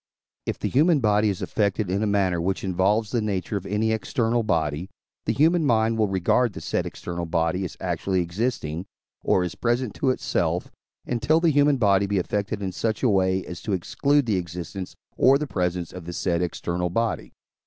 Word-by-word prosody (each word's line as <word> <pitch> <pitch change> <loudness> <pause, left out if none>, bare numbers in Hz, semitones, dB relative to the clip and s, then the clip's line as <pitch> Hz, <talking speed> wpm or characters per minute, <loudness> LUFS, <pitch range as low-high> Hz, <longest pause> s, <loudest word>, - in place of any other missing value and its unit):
If - - -1
the - - -2
human 155 +4 +4
body 105 -2 +3
is 95 - -3
affected 105 -1 0
in 100 +2 0
a 110 - +1
manner 95 -4 +1
which 95 +3 -1
involves 100 +4 +1
the 120 - +1
nature 105 -1 -2
of 100 -1 -3
any 105 +3 +1
external 115 +1 0
body, 80 -4 -1 0.4
the - - +1
human 160 +7 +3
mind 115 -4 +2
will 110 - +3
regard 95 +5 +2
the - - -7
said - - -2
external 85 -1 -5
body 85 +2 0
as 90 - -7
actually 95 -1 -1
existing, 85 -2 -2 0.4
or 90 - +3
as 90 - -3
present 120 -1 -1
to 135 - 0
itself, 130 - -1 0.3
until 125 +7 +2
the 165 -1 +3
human 145 -1 +4
body 100 -4 +3
be 100 0 0
affected 100 +2 -2
in 95 - -2
such 110 +6 -2
a 125 - +4
way, 95 -2 +2
as 90 - -7
to 105 - -2
exclude 140 +10 +1
the 105 -5 +1
existence 90 +2 -6 0.2
or 135 +2 +6
the 150 - -3
presence 90 - -2
of 90 -2 -8
the 85 - -6
said 85 -1 0
external 90 0 -2
body. 115 +5 -1
100 Hz, 195 wpm, -25 LUFS, 90-115 Hz, 0.4 s, or